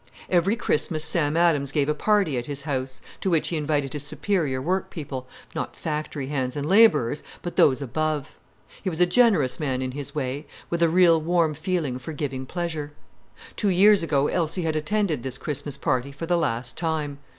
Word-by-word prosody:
Every 185 Hz, +4 st, +3 dB
Christmas 155 Hz, -7 st, 0 dB
Sam 155 Hz, -2 st, +2 dB
Adams 155 Hz, -5 st, +3 dB
gave 145 Hz, -1 st, +1 dB
a 150 Hz, -, +2 dB
party 200 Hz, -2 st, +2 dB
at 120 Hz, -1 st, -3 dB
his 140 Hz, -1 st, -4 dB
house, 130 Hz, -3 st, -3 dB, 0.2 s
to 190 Hz, -, -1 dB
which 165 Hz, -3 st, +1 dB
he 170 Hz, -, -2 dB
invited 145 Hz, -3 st, -1 dB
his 150 Hz, -, -3 dB
superior 150 Hz, -2 st, -1 dB
work 180 Hz, +8 st, -1 dB
people—not 135 Hz, -6 st, -7 dB
factory 150 Hz, -2 st, -4 dB
hands 130 Hz, -2 st, -2 dB
and 145 Hz, 0 st, -3 dB
labourers, 190 Hz, -, +4 dB, 0.2 s
but 175 Hz, -, -5 dB
those 140 Hz, 0 st, +4 dB
above. 155 Hz, +2 st, -2 dB, 0.5 s
He 190 Hz, -, -1 dB
was 160 Hz, -2 st, -4 dB
a 180 Hz, -, +6 dB
generous 175 Hz, -, +3 dB
man 135 Hz, -5 st, -1 dB
in 130 Hz, 0 st, -2 dB
his 145 Hz, +3 st, -6 dB
way, 140 Hz, +1 st, -3 dB, 0.2 s
with 170 Hz, 0 st, -1 dB
a 170 Hz, -, +5 dB
real 170 Hz, -1 st, +5 dB
warm 165 Hz, -1 st, +2 dB
feeling 155 Hz, -5 st, -2 dB
for 160 Hz, +5 st, -7 dB
giving 135 Hz, -3 st, -4 dB
pleasure. 160 Hz, -4 st, -4 dB, 0.6 s
Two 205 Hz, -, +1 dB
years 200 Hz, +3 st, +6 dB
ago 145 Hz, -4 st, +1 dB
Elsie 175 Hz, +1 st, -1 dB
had 160 Hz, -1 st, -1 dB
attended 160 Hz, -, 0 dB
this 130 Hz, 0 st, -4 dB
Christmas 145 Hz, -1 st, -5 dB
party 130 Hz, 0 st, -1 dB
for 140 Hz, +4 st, -6 dB
the 175 Hz, +1 st, +1 dB
last 125 Hz, -6 st, -1 dB
time. 155 Hz, -4 st, -2 dB
150 Hz, 185 wpm, -25 LUFS, 140-170 Hz, 0.6 s, a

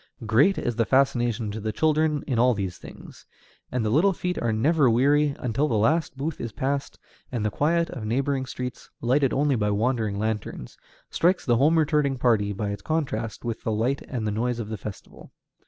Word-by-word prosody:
Great 120 Hz, -, +4 dB
is 120 Hz, -2 st, -2 dB
the 115 Hz, -, +3 dB
fascination 120 Hz, -5 st, +1 dB
to 110 Hz, -, -5 dB
the 110 Hz, +1 st, -2 dB
children 155 Hz, +2 st, +1 dB
in 125 Hz, -5 st, -1 dB
all 125 Hz, 0 st, +4 dB
these 95 Hz, -3 st, -4 dB
things, -, -, -13 dB, 0.4 s
and 125 Hz, -3 st, -1 dB
the 105 Hz, -, 0 dB
little 180 Hz, -, +4 dB
feet 180 Hz, 0 st, -3 dB
are 120 Hz, -, +1 dB
never 140 Hz, +5 st, +3 dB
weary 140 Hz, +5 st, +3 dB
until 125 Hz, +5 st, 0 dB
the 115 Hz, -, 0 dB
last 145 Hz, +7 st, +1 dB
booth 150 Hz, +4 st, -4 dB
is 115 Hz, -, -4 dB
passed, 140 Hz, +5 st, -3 dB, 0.3 s
and 115 Hz, -4 st, -2 dB
the 105 Hz, -, 0 dB
quiet 165 Hz, +7 st, +1 dB
of 120 Hz, -, -6 dB
neighboring 130 Hz, +4 st, -1 dB
streets, 125 Hz, -1 st, -6 dB
lighted 130 Hz, +3 st, +2 dB
only 140 Hz, 0 st, +2 dB
by 105 Hz, -3 st, 0 dB
wandering 110 Hz, -1 st, 0 dB
lanterns, 105 Hz, -, -4 dB, 0.4 s
strikes 180 Hz, +2 st, +2 dB
the 120 Hz, -3 st, +3 dB
home 155 Hz, +6 st, +4 dB
returning 150 Hz, -3 st, +2 dB
party 110 Hz, -5 st, +2 dB
by 100 Hz, +1 st, -3 dB
its 100 Hz, 0 st, -6 dB
contrast 120 Hz, -7 st, -3 dB
with 115 Hz, -2 st, -3 dB
the 110 Hz, -, -2 dB
light 120 Hz, +6 st, 0 dB
and 120 Hz, -5 st, -3 dB
noise 115 Hz, +3 st, -1 dB
of 110 Hz, -3 st, -5 dB
the 110 Hz, -, -3 dB
festival. 100 Hz, 0 st, -10 dB
125 Hz, 195 wpm, -25 LUFS, 110-145 Hz, 0.4 s, Great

